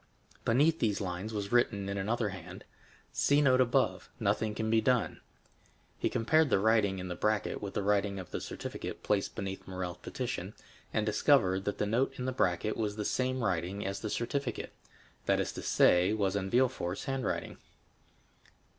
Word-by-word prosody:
Beneath 150 Hz, +8 st, +3 dB
these 105 Hz, -3 st, +1 dB
lines 95 Hz, +2 st, -4 dB
was 100 Hz, -2 st, -4 dB
written 105 Hz, -5 st, +2 dB
in 100 Hz, -, -2 dB
another 105 Hz, +3 st, 0 dB
hand: 90 Hz, -1 st, -9 dB, 0.5 s
"See 145 Hz, +1 st, +3 dB
note 130 Hz, -3 st, +5 dB
above—nothing 110 Hz, -3 st, 0 dB
can 110 Hz, 0 st, -1 dB
be 115 Hz, 0 st, +4 dB
done." 125 Hz, -2 st, +1 dB, 0.8 s
He -, -, +1 dB
compared 155 Hz, +6 st, +3 dB
the -, -, +4 dB
writing 105 Hz, -1 st, +3 dB
in 90 Hz, 0 st, -5 dB
the 90 Hz, -, -3 dB
bracket 105 Hz, +4 st, 0 dB
with 100 Hz, -1 st, -6 dB
the -, -, 0 dB
writing 100 Hz, 0 st, +1 dB
of 95 Hz, -2 st, -8 dB
the -, -, -3 dB
certificate -, -, -6 dB
placed 100 Hz, -2 st, 0 dB
beneath 95 Hz, 0 st, -5 dB
Morrel's 90 Hz, -2 st, -4 dB
petition, -, -, -4 dB, 0.4 s
and 110 Hz, -, 0 dB
discovered 105 Hz, -4 st, +3 dB
that 105 Hz, -, -2 dB
the -, -, 0 dB
note 125 Hz, +6 st, 0 dB
in 125 Hz, -, -3 dB
the 130 Hz, -, 0 dB
bracket 105 Hz, -2 st, 0 dB
was 105 Hz, -2 st, -1 dB
the 105 Hz, -1 st, -3 dB
same 130 Hz, -1 st, 0 dB
writing 95 Hz, +1 st, -1 dB
as 95 Hz, 0 st, -2 dB
the 110 Hz, -, -4 dB
certificate—that 120 Hz, +3 st, -3 dB
is -, -, -1 dB
to -, -, -7 dB
say, 90 Hz, +3 st, +4 dB
was 100 Hz, -3 st, 0 dB
in 95 Hz, -1 st, -1 dB
Villefort's 120 Hz, -7 st, +1 dB
handwriting. 135 Hz, -1 st, -2 dB
105 Hz, 170 wpm, -31 LUFS, 95-120 Hz, 0.8 s, note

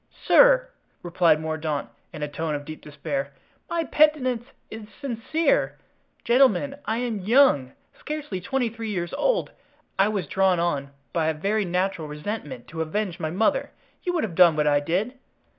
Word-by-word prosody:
"Sir!" -, -, +6 dB, 0.4 s
replied 170 Hz, -3 st, +3 dB
Mordaunt, 155 Hz, -2 st, -3 dB, 0.2 s
in 155 Hz, -3 st, -6 dB
a -, -, -1 dB
tone 155 Hz, +1 st, -3 dB
of 145 Hz, 0 st, -6 dB
deep 155 Hz, +1 st, -8 dB
despair, 140 Hz, -2 st, -4 dB, 0.4 s
"my 335 Hz, -1 st, 0 dB
penitence 265 Hz, -7 st, +2 dB, 0.2 s
is 220 Hz, -1 st, -8 dB
sincere. 280 Hz, +4 st, 0 dB, 0.5 s
Gentlemen, 260 Hz, +1 st, +3 dB
I 220 Hz, -, -1 dB
am 235 Hz, -3 st, -2 dB
young, 205 Hz, -, +4 dB, 0.3 s
scarcely 300 Hz, -11 st, -5 dB
twenty 265 Hz, +4 st, -1 dB
three 225 Hz, 0 st, -6 dB
years 175 Hz, -4 st, -3 dB
old. -, -, 0 dB, 0.5 s
I 195 Hz, -, +5 dB
was 205 Hz, -5 st, -2 dB
drawn 190 Hz, +3 st, +2 dB
on 145 Hz, -5 st, -1 dB, 0.2 s
by 165 Hz, -2 st, +1 dB
a 160 Hz, -, 0 dB
very 200 Hz, +6 st, 0 dB
natural 180 Hz, -2 st, -1 dB
resentment 150 Hz, -, -6 dB
to 165 Hz, 0 st, -5 dB
avenge 180 Hz, +2 st, -2 dB
my 155 Hz, -, -2 dB
mother. 220 Hz, -, +1 dB, 0.3 s
You 355 Hz, -, -2 dB
would 330 Hz, -, 0 dB
have 200 Hz, -, -3 dB
done 170 Hz, -2 st, +6 dB
what 150 Hz, -1 st, +1 dB
I 145 Hz, -1 st, +4 dB
did." 195 Hz, -, -2 dB
190 Hz, 160 wpm, -25 LUFS, 155-245 Hz, 0.5 s, Sir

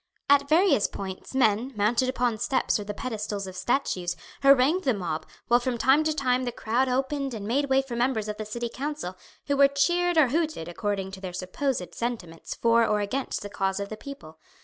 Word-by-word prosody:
At 280 Hz, 0 st, +4 dB
various 325 Hz, -, +4 dB
points 190 Hz, +6 st, -7 dB
men, 245 Hz, +1 st, +2 dB
mounted 230 Hz, +5 st, +2 dB
upon 245 Hz, -3 st, 0 dB
steps 260 Hz, -2 st, +1 dB
or -, -, -4 dB
the 205 Hz, +1 st, -5 dB
pedestals 210 Hz, -4 st, -4 dB
of 185 Hz, -1 st, -8 dB
statues, 185 Hz, -6 st, -1 dB, 0.3 s
harangued 275 Hz, +6 st, +5 dB
the 260 Hz, -4 st, +2 dB
mob 165 Hz, -5 st, -4 dB, 0.2 s
while 240 Hz, +1 st, +5 dB
from 245 Hz, -1 st, -2 dB
time 265 Hz, +6 st, +4 dB
to 310 Hz, -, +2 dB
time 255 Hz, -3 st, +1 dB
the 245 Hz, -, -2 dB
crowd 240 Hz, +4 st, 0 dB
opened 270 Hz, 0 st, -1 dB
and 205 Hz, -2 st, -6 dB
made 280 Hz, +5 st, 0 dB
way 270 Hz, 0 st, +3 dB
for 255 Hz, -3 st, -6 dB
members 235 Hz, -3 st, 0 dB
of 210 Hz, 0 st, -4 dB
the 215 Hz, -, -4 dB
city 235 Hz, +3 st, -3 dB
council, 275 Hz, -7 st, -5 dB, 0.3 s
who 285 Hz, -, +1 dB
were 280 Hz, 0 st, +7 dB
cheered 345 Hz, +5 st, +1 dB
or 295 Hz, -5 st, +6 dB
hooted 315 Hz, -, -1 dB
according 195 Hz, +1 st, -3 dB
to 190 Hz, 0 st, -9 dB
their 185 Hz, -2 st, -6 dB
supposed 185 Hz, -, -3 dB
sentiments 215 Hz, -9 st, -5 dB
for 230 Hz, 0 st, +3 dB
or 210 Hz, -2 st, +2 dB
against 230 Hz, +6 st, -2 dB
the -, -, -5 dB
cause 195 Hz, 0 st, -1 dB
of 200 Hz, 0 st, -4 dB
the 215 Hz, -, -5 dB
people. 215 Hz, -, -11 dB
240 Hz, 205 wpm, -26 LUFS, 205-275 Hz, 0.3 s, were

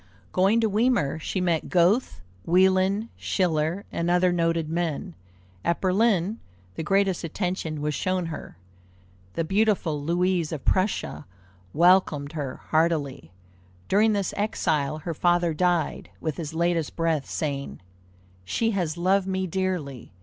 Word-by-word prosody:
Going 195 Hz, +5 st, +3 dB
to 225 Hz, -, +3 dB
Weimar, 215 Hz, -, +1 dB
she 185 Hz, -, -3 dB
met 170 Hz, -3 st, 0 dB
Goethe, 180 Hz, -, +2 dB, 0.2 s
Wieland, 190 Hz, -, +3 dB
Schiller, 170 Hz, +1 st, 0 dB
and 170 Hz, +1 st, -1 dB
other 180 Hz, +1 st, +3 dB
noted 165 Hz, -2 st, 0 dB
men. 165 Hz, -, -2 dB, 0.5 s
At 170 Hz, -, 0 dB
Berlin, 200 Hz, +1 st, +1 dB, 0.3 s
the -, -, -5 dB
greatest 195 Hz, +2 st, +1 dB
attention 165 Hz, -3 st, -3 dB
was 150 Hz, 0 st, -1 dB
shown 185 Hz, +3 st, -1 dB
her. 160 Hz, -, -7 dB, 0.8 s
The 165 Hz, -, -1 dB
beautiful 195 Hz, -5 st, +1 dB
Louise 175 Hz, +1 st, 0 dB
of 155 Hz, -5 st, -5 dB
Prussia 185 Hz, -, 0 dB, 0.4 s
welcomed 165 Hz, -, +3 dB
her 145 Hz, -5 st, -4 dB, 0.2 s
heartily. 155 Hz, -, 0 dB, 0.6 s
During 215 Hz, +2 st, +3 dB
this 200 Hz, -2 st, -1 dB
exile 155 Hz, -8 st, 0 dB
her 165 Hz, +2 st, -4 dB
father 175 Hz, +1 st, +2 dB
died, 175 Hz, -1 st, 0 dB
with 155 Hz, -3 st, -3 dB
his 160 Hz, -1 st, -5 dB
latest 170 Hz, -2 st, 0 dB
breath 165 Hz, -4 st, 0 dB
saying," 140 Hz, -3 st, -3 dB, 0.6 s
She 225 Hz, -, 0 dB
has 175 Hz, -6 st, -2 dB
loved 190 Hz, +2 st, +2 dB
me 190 Hz, 0 st, -1 dB
dearly! 175 Hz, -, -3 dB
175 Hz, 130 wpm, -25 LUFS, 155-190 Hz, 0.8 s, Going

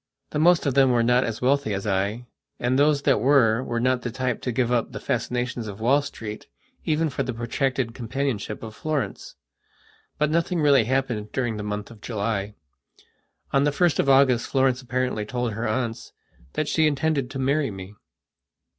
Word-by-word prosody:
The 150 Hz, -, -1 dB
most 175 Hz, +2 st, +4 dB
of 140 Hz, -, +1 dB
them 135 Hz, 0 st, +5 dB
were 120 Hz, -2 st, +3 dB
not 125 Hz, +2 st, +3 dB
as 115 Hz, +1 st, -4 dB
wealthy 135 Hz, -5 st, +2 dB
as 95 Hz, -, -4 dB
I, 105 Hz, +4 st, -1 dB, 0.3 s
and 125 Hz, +2 st, +1 dB
those 145 Hz, -1 st, +3 dB
that 135 Hz, -, +3 dB
were 125 Hz, -4 st, +4 dB
were 120 Hz, -2 st, -2 dB
not 125 Hz, +1 st, +1 dB
the 120 Hz, -, -3 dB
type 125 Hz, 0 st, -2 dB
to 125 Hz, -, -2 dB
give 120 Hz, 0 st, 0 dB
up 120 Hz, -2 st, 0 dB
the -, -, -6 dB
fascinations 125 Hz, -2 st, -2 dB
of 100 Hz, 0 st, -7 dB
Wall 130 Hz, +6 st, +3 dB
Street 110 Hz, -7 st, -7 dB, 0.4 s
even 160 Hz, +1 st, +1 dB
for -, -, -3 dB
the 125 Hz, -, -3 dB
protracted 120 Hz, +1 st, -1 dB
companionship 120 Hz, -3 st, -3 dB
of 110 Hz, -1 st, -7 dB
Florence. 135 Hz, -4 st, -3 dB, 0.8 s
But 150 Hz, 0 st, +1 dB
nothing 170 Hz, +2 st, +1 dB
really 140 Hz, -6 st, +4 dB
happened 120 Hz, -4 st, -1 dB
during 120 Hz, -4 st, -1 dB
the -, -, -4 dB
month 105 Hz, +1 st, -4 dB
of 110 Hz, -3 st, -14 dB
July. 105 Hz, -2 st, -3 dB, 1.0 s
On 135 Hz, -, +4 dB
the 145 Hz, -, +3 dB
1st 170 Hz, +2 st, +1 dB
of 140 Hz, -, +2 dB
August 135 Hz, -3 st, +4 dB
Florence 130 Hz, -2 st, +1 dB
apparently 125 Hz, -3 st, -2 dB
told 120 Hz, +1 st, -3 dB
her 115 Hz, +3 st, -3 dB
aunts 115 Hz, +1 st, -3 dB, 0.4 s
that 155 Hz, -, -1 dB
she 160 Hz, 0 st, +3 dB
intended 145 Hz, -3 st, 0 dB
to 135 Hz, -, -6 dB
marry 140 Hz, +2 st, +1 dB
me. 95 Hz, 0 st, -9 dB
125 Hz, 185 wpm, -24 LUFS, 115-140 Hz, 1.0 s, them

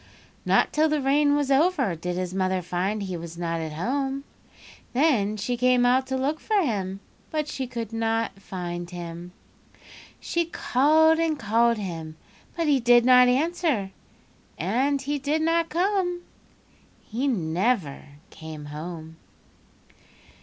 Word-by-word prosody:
"Not -, -, +3 dB
till 310 Hz, +1 st, +3 dB
the 305 Hz, 0 st, +1 dB
rain 285 Hz, +1 st, +3 dB
was 290 Hz, -1 st, 0 dB
over 275 Hz, -, +2 dB
did 175 Hz, +2 st, -4 dB
his 185 Hz, -1 st, -3 dB
mother 185 Hz, -1 st, 0 dB
find 190 Hz, +4 st, -2 dB
he 185 Hz, -2 st, -4 dB
was 170 Hz, 0 st, -8 dB
not 165 Hz, -1 st, -2 dB
at 160 Hz, -1 st, -5 dB
home. 270 Hz, -, -2 dB, 0.7 s
Then 240 Hz, -7 st, +2 dB
she 230 Hz, +4 st, -2 dB
came 250 Hz, 0 st, +3 dB
out 260 Hz, +2 st, +3 dB
to 265 Hz, -, -1 dB
look 285 Hz, +4 st, -1 dB
for 430 Hz, -2 st, +1 dB
him, 195 Hz, -, -2 dB, 0.3 s
but 305 Hz, -1 st, -2 dB
she 265 Hz, -3 st, -4 dB
could 230 Hz, -2 st, -6 dB
not 225 Hz, -3 st, -1 dB
find 175 Hz, -2 st, -5 dB
him. 175 Hz, 0 st, -8 dB, 0.9 s
She 340 Hz, 0 st, -1 dB
called 315 Hz, +1 st, +3 dB
and 325 Hz, -2 st, +1 dB
called 230 Hz, +1 st, +2 dB
him 165 Hz, -6 st, -6 dB, 0.4 s
but 335 Hz, -, 0 dB
he 290 Hz, -3 st, +3 dB
did 240 Hz, 0 st, +5 dB
not 250 Hz, 0 st, +7 dB
answer 280 Hz, -, 0 dB, 0.7 s
and 255 Hz, -, 0 dB
he 285 Hz, +2 st, -2 dB
did 300 Hz, +3 st, 0 dB
not 330 Hz, 0 st, +1 dB
come. 355 Hz, 0 st, 0 dB, 0.9 s
He 245 Hz, +6 st, -2 dB
never 180 Hz, -, 0 dB, 0.3 s
came 155 Hz, -2 st, -9 dB
home. 160 Hz, 0 st, -7 dB
240 Hz, 140 wpm, -25 LUFS, 180-290 Hz, 0.9 s, not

